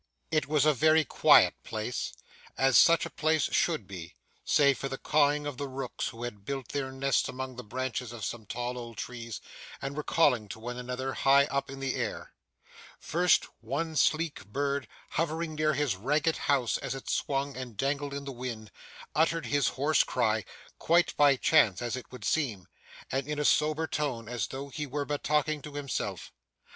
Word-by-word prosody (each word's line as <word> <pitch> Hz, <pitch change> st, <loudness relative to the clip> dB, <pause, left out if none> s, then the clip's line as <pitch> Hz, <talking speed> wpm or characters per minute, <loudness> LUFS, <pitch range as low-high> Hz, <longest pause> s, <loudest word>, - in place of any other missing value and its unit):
It 155 Hz, -3 st, +1 dB
was 150 Hz, -1 st, +3 dB
a 155 Hz, -, +5 dB
very 155 Hz, +3 st, +4 dB
quiet -, -, +6 dB
place, -, -, -3 dB, 0.5 s
as 135 Hz, -1 st, +3 dB
such 165 Hz, 0 st, +6 dB
a -, -, -5 dB
place 155 Hz, -1 st, +1 dB
should 160 Hz, -, +1 dB
be, 90 Hz, -4 st, -9 dB, 0.3 s
save 140 Hz, -3 st, +4 dB
for 135 Hz, -, -3 dB
the 135 Hz, -, -4 dB
cawing 150 Hz, 0 st, +2 dB
of 145 Hz, -3 st, -4 dB
the 140 Hz, -, -3 dB
rooks 130 Hz, -1 st, -4 dB
who 115 Hz, +1 st, -7 dB
had 105 Hz, -5 st, -6 dB
built 135 Hz, +1 st, -4 dB
their 135 Hz, -2 st, -3 dB
nests 135 Hz, 0 st, +1 dB
among 130 Hz, 0 st, -5 dB
the 125 Hz, -, -7 dB
branches 125 Hz, +2 st, -3 dB
of 115 Hz, -4 st, -5 dB
some 110 Hz, 0 st, -5 dB
tall 125 Hz, +1 st, -3 dB
old 115 Hz, -2 st, -9 dB
trees, 115 Hz, -3 st, -6 dB, 0.4 s
and 135 Hz, +1 st, -5 dB
were 150 Hz, -, -2 dB
calling 130 Hz, -9 st, +2 dB
to 110 Hz, -, -7 dB
one 120 Hz, +2 st, -5 dB
another, 125 Hz, +2 st, -3 dB
high 140 Hz, +1 st, +5 dB
up 140 Hz, 0 st, -1 dB
in 135 Hz, 0 st, -7 dB
the 135 Hz, -1 st, -1 dB
air. -, -, -4 dB, 0.6 s
First, 175 Hz, +2 st, +2 dB
one 145 Hz, +8 st, -3 dB
sleek 155 Hz, -2 st, +1 dB
bird, 140 Hz, +4 st, -1 dB, 0.2 s
hovering 165 Hz, 0 st, -1 dB
near 155 Hz, 0 st, +1 dB
his 145 Hz, -8 st, +1 dB
ragged 150 Hz, -, +1 dB
house 130 Hz, -5 st, +2 dB
as -, -, -4 dB
it 135 Hz, -, -9 dB
swung 140 Hz, 0 st, -1 dB
and 125 Hz, -4 st, -7 dB
dangled 140 Hz, +2 st, -1 dB
in 140 Hz, 0 st, -5 dB
the 140 Hz, -, -4 dB
wind, 120 Hz, -4 st, -6 dB, 0.4 s
uttered 165 Hz, +2 st, +2 dB
his 145 Hz, -3 st, +2 dB
hoarse 145 Hz, +3 st, +3 dB
cry, 110 Hz, -4 st, 0 dB, 0.3 s
quite 170 Hz, +1 st, +3 dB
by 145 Hz, -1 st, +6 dB
chance 100 Hz, -6 st, +4 dB
as 120 Hz, 0 st, -2 dB
it 130 Hz, -, -8 dB
would 125 Hz, -, -8 dB
seem, 115 Hz, -12 st, -1 dB, 0.4 s
and 135 Hz, +1 st, -1 dB
in 150 Hz, 0 st, -2 dB
a 150 Hz, -, 0 dB
sober 155 Hz, +2 st, +3 dB
tone 135 Hz, -8 st, -2 dB
as 115 Hz, -6 st, -2 dB
though 135 Hz, +5 st, -6 dB
he 150 Hz, +1 st, -4 dB
were 145 Hz, +2 st, -2 dB
but 145 Hz, 0 st, -3 dB
talking 150 Hz, 0 st, +1 dB
to 145 Hz, 0 st, -9 dB
himself. 145 Hz, -2 st, -4 dB
135 Hz, 190 wpm, -29 LUFS, 125-150 Hz, 0.6 s, quiet